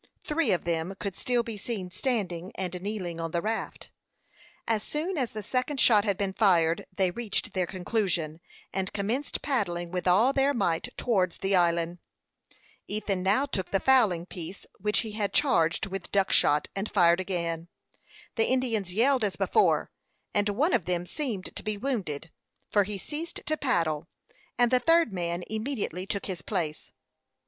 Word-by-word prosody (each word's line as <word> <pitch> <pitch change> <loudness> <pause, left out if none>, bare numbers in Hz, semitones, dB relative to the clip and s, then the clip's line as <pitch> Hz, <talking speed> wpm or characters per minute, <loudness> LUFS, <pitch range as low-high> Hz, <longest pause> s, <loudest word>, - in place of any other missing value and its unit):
Three 300 -6 +1
of 175 -4 0
them 170 +2 -1
could 200 -2 -3
still 245 -2 +1
be 230 -2 -6
seen 195 -4 -5
standing 190 -7 -2
and 180 -1 -3
kneeling 185 -4 -4
on 165 0 -2
the 170 +1 -1
raft. 220 +1 -3 0.8
As 225 -2 +1
soon 320 - -2
as 260 -6 0
the 215 -1 -6
second 255 +6 -1
shot 215 -5 +5
had 200 -3 +1
been 200 -2 -1
fired, 170 -6 +3
they 185 -1 +1
reached 225 +1 -2
their 185 -2 0
conclusion, 180 -5 -1 0.3
and 190 0 -2
commenced 225 +8 -2
paddling 175 -11 -1
with 180 0 -2
all 215 +9 +5
their 275 +1 +3
might 165 -8 +1
towards 190 -7 +1
the 195 0 +1
island. 170 -1 +2 0.9
Ethan 205 -2 -1
now 200 +9 +3
took 190 -10 -3
the 195 - +2
fowling 215 -11 +4
piece, 180 +1 -7
which 210 +1 +2
he 220 - -6
had 210 -1 -2
charged 170 - +3
with 195 -1 -6
duck 195 -1 +2
shot, 150 0 +3
and 195 +2 -2
fired 175 -3 +4
again. 170 -3 -2 0.7
The 225 - +3
Indians 230 -7 0
yelled 250 +5 +3
as 200 -3 0
before, - - +2 0.4
and 205 0 +2
one 290 - +2
of 205 -9 +2
them 175 -1 -1
seemed 225 - -4
to - - -3
be 215 -1 -2
wounded, 190 - -3 0.4
for 205 -2 +3
he 205 0 -4
ceased 305 - -6
to 310 - +1
paddle, 165 - 0 0.5
and 245 0 +4
the 255 - +5
third 330 -4 +4
man 175 -1 -2
immediately 220 -4 -3
took 200 - -3
his 185 -5 -4
place. 160 -5 -3
200 Hz, 170 wpm, -28 LUFS, 175-235 Hz, 0.9 s, shot